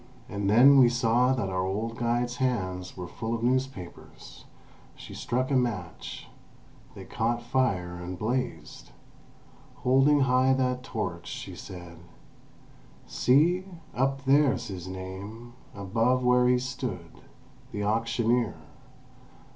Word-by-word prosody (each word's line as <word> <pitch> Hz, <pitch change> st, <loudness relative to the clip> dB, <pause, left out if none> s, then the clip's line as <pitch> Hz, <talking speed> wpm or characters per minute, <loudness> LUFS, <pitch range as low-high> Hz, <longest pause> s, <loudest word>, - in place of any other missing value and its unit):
And 100 Hz, -1 st, -2 dB
then 135 Hz, +6 st, +7 dB
we 125 Hz, -2 st, +7 dB
saw 125 Hz, +1 st, +2 dB
that 115 Hz, -7 st, -1 dB
our 95 Hz, 0 st, -1 dB
old 110 Hz, +5 st, -3 dB
guide's 120 Hz, +1 st, -1 dB
hands 95 Hz, -9 st, -2 dB
were 90 Hz, -1 st, -5 dB
full 115 Hz, +5 st, -4 dB
of 115 Hz, -, -5 dB
newspapers. 130 Hz, -7 st, -4 dB, 0.5 s
She -, -, -11 dB
struck 130 Hz, +3 st, -2 dB
a -, -, +3 dB
match; 105 Hz, -10 st, -3 dB, 0.7 s
they 95 Hz, -, -9 dB
caught 120 Hz, +4 st, -1 dB
fire 95 Hz, -10 st, 0 dB
and 90 Hz, +1 st, -6 dB
blazed. 125 Hz, +6 st, -3 dB, 0.9 s
Holding 135 Hz, +3 st, +4 dB
high 130 Hz, 0 st, +3 dB
that 125 Hz, -1 st, 0 dB
torch, 130 Hz, -, -5 dB
she -, -, -7 dB
said: 90 Hz, -2 st, -10 dB, 1.1 s
"See! 165 Hz, +8 st, +3 dB, 0.3 s
Up 135 Hz, +1 st, -1 dB
there's 140 Hz, -2 st, +3 dB
his 95 Hz, -2 st, -6 dB
name, 95 Hz, +6 st, -8 dB, 0.2 s
above 115 Hz, +6 st, +1 dB
where 125 Hz, 0 st, +4 dB
he 125 Hz, 0 st, +4 dB
stood. 125 Hz, -9 st, -5 dB, 0.5 s
The 105 Hz, -, -3 dB
auctioneer. 115 Hz, +2 st, +1 dB
120 Hz, 120 wpm, -27 LUFS, 100-130 Hz, 1.1 s, then